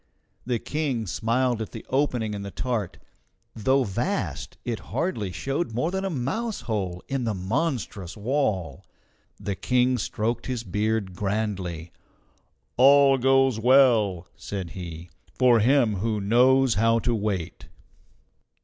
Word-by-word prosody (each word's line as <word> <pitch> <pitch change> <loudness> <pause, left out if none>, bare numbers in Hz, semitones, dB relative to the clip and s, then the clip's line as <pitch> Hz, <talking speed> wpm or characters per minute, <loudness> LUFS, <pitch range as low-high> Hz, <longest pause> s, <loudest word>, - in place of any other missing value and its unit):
The 125 -2 +1
King 135 -3 -2
smiled 115 +6 0
at 110 - -6
the - - -8
opening 125 -6 0
in 100 - -4
the 100 - -6
tart; 110 -3 -3 0.6
though 130 +5 +2
vast, 110 - -3
it 115 -3 -2
hardly 110 - -2
showed 135 - -3
more 160 +8 0
than 190 0 -2
a 195 - -1
mouse 175 - -3
hole 100 -7 -3
in 135 -2 -2
the 110 -3 -1
monstrous 105 - -3
wall. 105 - -1 0.6
The 100 - -3
King 125 +4 +1
stroked 115 +3 -2
his 125 -3 -3
beard 105 0 -1
grandly. 95 -4 -3 0.9
"All 135 0 +6
goes 135 -2 +3
well," 115 -8 +4
said 95 -5 -6
he, 85 -2 -8 0.2
"for 125 -3 +5
him 120 -2 +3
who 110 +2 -1
knows 125 +5 +4
how 115 +2 +3
to 120 +1 0
wait." 100 -6 -3
115 Hz, 130 wpm, -25 LUFS, 100-130 Hz, 0.9 s, All